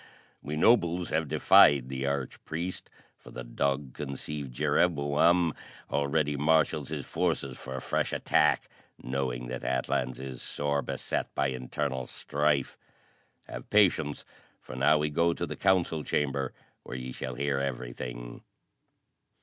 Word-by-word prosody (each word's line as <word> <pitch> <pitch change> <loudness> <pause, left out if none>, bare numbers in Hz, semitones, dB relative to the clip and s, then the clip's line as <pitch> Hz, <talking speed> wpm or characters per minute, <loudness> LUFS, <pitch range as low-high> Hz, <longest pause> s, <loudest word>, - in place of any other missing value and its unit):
We 75 - -4
nobles 90 -3 +3
have 80 0 +1
defied 70 -2 +6
the 65 +1 -3
arch 70 -2 -3
priest, 85 +3 -4 0.3
for - - -14
the 60 - -7
dog 70 +2 -1
conceived 70 -1 -5
Jereboam 80 +4 +2 0.4
already 75 +1 +1
marshals 75 -1 +2
his - - -4
forces 65 -2 -1
for 65 0 -6
a 65 - -4
fresh - - -1
attack, - - +2 0.4
knowing 65 -1 -2
that 65 0 -5
Atlans 65 0 -1
is 65 -2 -7
sore 70 0 -1
beset - - -3
by 70 0 +1
internal 65 0 -3
strife. 75 -1 -1 0.6
Have - - -9
patience 90 -8 +3 0.3
for - - -10
now 70 +4 +4
we 75 0 -1
go 85 +2 +2
to 85 - -2
the - - -6
council 90 -5 +2
chamber, 70 -3 -1 0.3
where - - -7
ye 65 0 -6
shall 65 0 -5
hear 70 +1 0
everything." - - -5
70 Hz, 135 wpm, -29 LUFS, 65-75 Hz, 0.6 s, defied